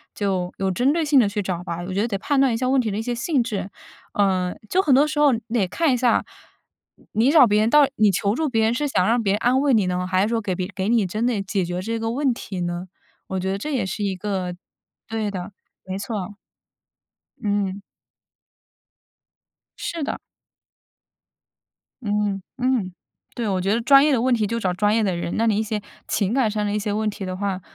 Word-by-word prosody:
就 190 -3 -1
有 190 -1 0
针 250 +9 +2
对 325 0 0
性 285 -2 +5
地 210 -4 +3
去 205 +1 -3
找 180 -2 -3
吧， 170 -1 -4
我 185 - -4
觉 200 - +1
得 230 - +1
得 200 -4 -2
判 280 +7 0
断 265 -3 +4
一 - - 0
下 255 +1 -1
问 265 0 +3
题 220 - -2
的 200 - -3
一 - - -1
些 245 0 -2
性 260 +1 0
质。 205 -3 -4 0.4
呃， 185 -3 +1
就 375 - +3
很 275 -8 +4
多 285 +3 +5
时 300 -1 -2
候 290 -2 +6 0.2
得 220 -6 +1
看 310 - +1
一 - - +1
下， 240 -2 +2 0.9
你 225 +3 +2
你 - - +5
找 305 -6 +8
别 210 -1 +2
人 220 - +2
到 295 0 +6
你 215 -1 +5
求 200 +2 0
助 315 -1 0
别 225 -3 +1
人 225 - +2
是 290 +4 -1
想 185 -9 +1
让 235 +1 +2
别 200 -2 +1
人 - - +1
安 250 +4 +2
慰 285 -3 +3
你 205 -4 +3
呢？ 180 0 -1
还 185 +1 +2
是 - - +1
说 230 -1 0
给 190 -3 -2
别 185 0 -3
给 190 +2 -1
你 230 -4 +3
真 215 +6 -2
的 230 -5 0
解 195 -1 -1
决 175 +1 -3
这 225 +3 -3
个 225 0 -2
问 265 0 +1
题 190 -5 -7
呢？ 175 +1 -3 0.4
我 190 -1 -3
觉 190 +1 -2
得 195 - -1
这 300 +8 -4
也 245 - 0
是 200 +2 -4
一 195 -2 -1
个 185 -2 -3 0.5
对 215 -1 -2
的， 185 +1 -6 0.3
没 190 +1 -4
错。 205 -1 -5 1.1
嗯。 200 -2 -1 2.0
是 330 -3 -4
的。 - - -3 1.8
嗯， 205 -2 -1 0.2
嗯， 245 -8 0 0.4
对， 235 -3 -2
我 190 -2 0
觉 195 +3 +1
得 230 - +1
专 275 +3 +7
业 300 - +3
的 240 -4 +2
问 255 0 +2
题 220 -3 +1
就 230 +2 -2
找 185 -4 0
专 205 +3 +2
业 225 - +2
的 185 -3 0
人。 170 0 -3
那 225 +1 +2
你 210 -2 +2
一 220 - +1
些 215 -1 -3 0.3
情 205 +1 0
感 255 -5 +2
上 210 0 -1
的 205 - -1
一 210 - 0
些 205 0 -2
问 215 +1 0
题 200 -2 -6
的 185 0 -4
话， 195 -1 -2
210 Hz, 250 characters per minute, -23 LUFS, 190-245 Hz, 2.0 s, 找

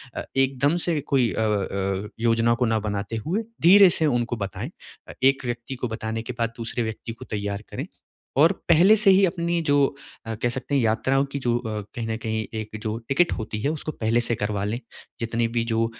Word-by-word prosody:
अ, - - -3
एकदम 135 +3 +2
से 160 -3 +1
कोई 125 -5 +3
अ - - -1
अ, 100 -1 -1
योजना 115 0 +3
को 125 +1 +1
ना 110 -1 +1
बनाते 105 0 -3
हुए, 200 +8 0 0.2
धीरे 195 +3 +8
से 160 - +3
उनको 120 -4 +1
बताएँ। 100 -3 -5 0.4
अ, - - -7
एक 135 0 +3
व्यक्ति 120 +2 -4
को 125 -1 -3
बताने 110 0 -4
के 125 - -5
बाद 115 0 0
दूसरे 115 +1 -4
व्यक्ति 110 +1 -5
को 115 - -11
तैयार 100 -1 -3
करें - - -5 0.5
और 160 +4 +6 0.2
पहले 180 +6 +7
से 210 -2 +4
ही 195 +1 +6
अपनी 170 -1 -1
जो 145 -2 +3 0.4
अ, 115 - -3
कह 120 +2 -1
सकते 130 +3 -3
हैं, 135 - +3
यात्राओं 130 +5 +2
की 140 - -3
जो 120 -2 +1
अ, 110 -3 -4
कहीं 115 -2 -3
न 110 - -1
कहीं 110 -1 -1
एक 110 0 -6
जो 110 +1 -2
टिकट 170 +6 +3
होती 105 -1 -4
है, 140 - +1
उसको 155 0 -4
पहले 115 -3 0
से 120 0 0
करवा 105 -1 -2
लें। 110 +4 -2 0.4
जितने 115 0 0
भी 115 0 -1
जो 115 0 +2
120 Hz, 215 wpm, -24 LUFS, 110-140 Hz, 0.5 s, धीरे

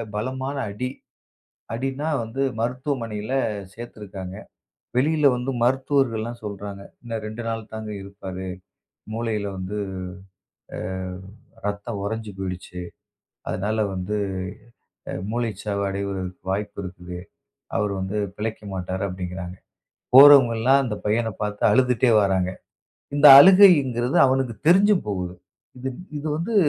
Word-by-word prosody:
பலமான 130 +5 -3 0.2
அடி. 125 +5 -3 0.8
அடினா 135 +5 -2
வந்து 115 +5 -4 0.2
மருத்துவமனையில 120 -2 -3 0.4
சேர்த்துருக்காங்க. 100 -5 -8 0.6
வெளியில 150 +1 +4
வந்து 125 +2 -3
மருத்துவர்கள் 130 -2 +2
எல்லாம் 120 +1 -6
சொல்றாங்க. 100 -1 -6 0.2
இன்னும் 115 -2 -5
2 110 +2 -6
நாள் 115 -1 -4
தாங்க 110 -1 -6
இருப்பாரு. 95 -1 -7 0.7
மூளைல 110 -2 -2
வந்து, 95 +3 -4 1.0
அ, - - -5 0.9
ரத்தம் 105 +1 -3
உறைஞ்சு 110 +1 -4
போயிடுச்சு. 90 -1 -5 0.7
அதனால 105 +3 -1 0.2
வந்து, 95 +3 -3 0.9
அ, - - -3 0.2
மூளைச் 115 -4 -3
சாவடைய 100 -1 -2 0.5
வாய்ப்பு 100 +1 -3
இருக்குது. 90 -1 -8 0.6
அவர் 105 -1 0
வந்து 95 +3 -3 0.2
பிழைக்கமாட்டாரு 100 -4 -4
அப்படிங்கிறாங்க. 90 0 -6 0.6
போறவங்க 135 -3 +9
எல்லாம் 135 +4 +4
அந்தப் 105 -5 -4
பையனைப் 110 0 0
பாத்து 105 -1 -3
அழுதுட்டே 125 -1 +3
வராங்க. 95 -2 +1 0.6
இந்த 145 +1 +6
அழுகைங்கிறது 140 - +6
அவனுக்குத் 130 -2 -1
தெரிஞ்சும் 195 +2 +5
போகுது. 90 -3 -3 0.4
இது 130 +1 -4 0.3
இது 145 - -6
வந்து 175 +8 -3
110 Hz, 110 wpm, -23 LUFS, 100-130 Hz, 1.0 s, போறவங்க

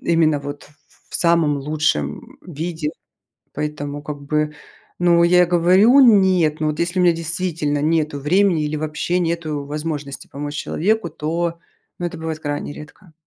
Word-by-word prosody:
именно 160 -3 +2
вот 145 +1 -7
ф - - -18
ф 150 - -28 0.3
в - - -13
самом 170 -4 +2
лучшем 135 - -2
виде. 160 -1 -4 0.7
Поэтому, 145 -1 -4
как 145 -1 -6
бы, 150 +1 -1 0.5
ну, 170 -1 +4
я 180 0 +5
говорю: 185 +9 +5
"Нет", 190 - +4
ну 155 - +1
вот, 150 - -3
если 170 +2 -1
у - - +3
меня 175 -1 +5
действительно 165 -3 -2
нету 155 -2 0
времени 175 +2 +2
или 150 +1 -2
вообще 155 +3 -2
нету 165 -4 -2
возможности 150 -1 -5
помочь 145 +1 -6
человеку, 205 +4 0
то, 170 +2 -3 0.4
ну, 175 - -2
это 170 -1 -6
бывает 160 -1 -4
крайне 145 -1 -4
редко. 150 +3 -13
160 Hz, 160 wpm, -20 LUFS, 150-175 Hz, 0.7 s, я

